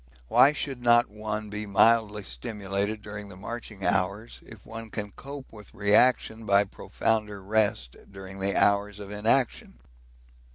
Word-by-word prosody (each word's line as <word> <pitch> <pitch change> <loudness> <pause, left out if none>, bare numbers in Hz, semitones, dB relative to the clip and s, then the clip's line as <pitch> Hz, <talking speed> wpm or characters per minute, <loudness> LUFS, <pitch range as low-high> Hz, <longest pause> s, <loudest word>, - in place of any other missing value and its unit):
Why 140 - +6
should 140 -4 -4
not 120 -2 +4
one 105 0 -5
be 105 0 -5
mildly 105 0 +3
stimulated 100 - -3
during 105 -1 -8
the 95 - -11
marching 110 0 -7
hours 100 +3 -1
if 110 -4 -14
one 115 0 -8
can 105 -1 -5
cope 140 +1 -10
with 105 -2 -14
reaction 110 +2 +3
by 100 -1 +4
profounder 105 +1 -2
rest 100 - 0 0.2
during 95 0 -10
the 100 +1 0
hours 100 0 +2
of 100 -1 -8
inaction? 110 - 0
105 Hz, 140 wpm, -27 LUFS, 100-110 Hz, 0.2 s, Why